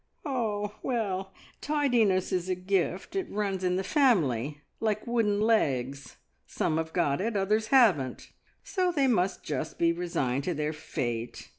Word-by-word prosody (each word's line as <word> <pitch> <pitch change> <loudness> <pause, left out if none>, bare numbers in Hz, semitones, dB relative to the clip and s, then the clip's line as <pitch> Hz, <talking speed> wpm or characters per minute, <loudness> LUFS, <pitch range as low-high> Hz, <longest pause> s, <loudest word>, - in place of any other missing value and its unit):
"Ah, 215 -7 -1
well, 195 -6 -2 0.3
tidiness 245 -11 +2
is 185 0 -1
a 185 - +1
gift. 185 - -1
It 385 -2 -2
runs 200 -2 -2
in 180 0 +1
the 190 - -1
family 150 - +2 0.2
like 215 -1 -1
wooden 225 -4 +1
legs. 140 - 0 0.3
Some 155 - -1
have 160 0 -2
got 160 -3 +1
it, 210 - 0
and 225 -3 -1
others 210 +3 +1
haven't, 195 - +3 0.3
so 365 -3 0
they 285 -5 +2
must 195 -7 +1
just 155 +1 -4
be 170 0 +3
resigned 145 -7 -1
to 175 - -1
their 150 +1 -1
fate. 120 -6 -4
190 Hz, 155 wpm, -28 LUFS, 155-225 Hz, 0.3 s, haven't